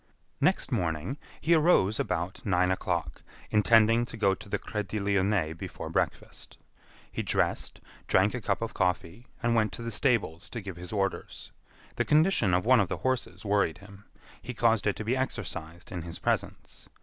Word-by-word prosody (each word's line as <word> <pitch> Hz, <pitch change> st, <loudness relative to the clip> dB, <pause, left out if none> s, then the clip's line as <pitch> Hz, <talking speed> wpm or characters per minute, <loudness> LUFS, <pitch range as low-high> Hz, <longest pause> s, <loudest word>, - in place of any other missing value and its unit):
Next -, -, +1 dB
morning, 80 Hz, -, -1 dB, 0.2 s
he 165 Hz, +3 st, +3 dB
arose 155 Hz, -, +4 dB
about 85 Hz, +4 st, -2 dB
nine 90 Hz, -2 st, +2 dB
o'clock, 85 Hz, -6 st, -2 dB, 0.3 s
intending 115 Hz, +2 st, +5 dB
to 115 Hz, -, -9 dB
go 100 Hz, -3 st, +3 dB
to 95 Hz, -, -9 dB
the -, -, 0 dB
Crédit 105 Hz, 0 st, -4 dB
Lyonnais 100 Hz, -4 st, +1 dB
before 80 Hz, -, -7 dB
breakfast. -, -, -3 dB, 0.5 s
He -, -, -2 dB
dressed, -, -, -1 dB, 0.3 s
drank 95 Hz, +3 st, +3 dB
a 125 Hz, -, -3 dB
cup 100 Hz, +2 st, -1 dB
of 115 Hz, -, -4 dB
coffee, 90 Hz, +4 st, -1 dB, 0.2 s
and 120 Hz, 0 st, +2 dB
went 110 Hz, -2 st, +2 dB
to 120 Hz, -, -5 dB
the 115 Hz, -, -4 dB
stables 105 Hz, -, 0 dB
to 120 Hz, -, -5 dB
give 95 Hz, -4 st, -7 dB
his 90 Hz, 0 st, -8 dB
orders. 100 Hz, -2 st, -3 dB, 0.5 s
The -, -, +1 dB
condition 150 Hz, -, +3 dB
of 90 Hz, -, 0 dB
one 130 Hz, +1 st, +6 dB
of 100 Hz, -, +2 dB
the -, -, -2 dB
horses 130 Hz, -3 st, -1 dB
worried 100 Hz, -6 st, +1 dB
him. 100 Hz, 0 st, -15 dB, 0.4 s
He 125 Hz, 0 st, -7 dB
caused 115 Hz, -3 st, +2 dB
it 100 Hz, -, +2 dB
to 110 Hz, -, -6 dB
be 120 Hz, +4 st, +1 dB
exercised 95 Hz, -7 st, -5 dB
in 90 Hz, -3 st, -4 dB
his 85 Hz, 0 st, -7 dB
presence. -, -, -3 dB
100 Hz, 175 wpm, -29 LUFS, 90-115 Hz, 0.5 s, one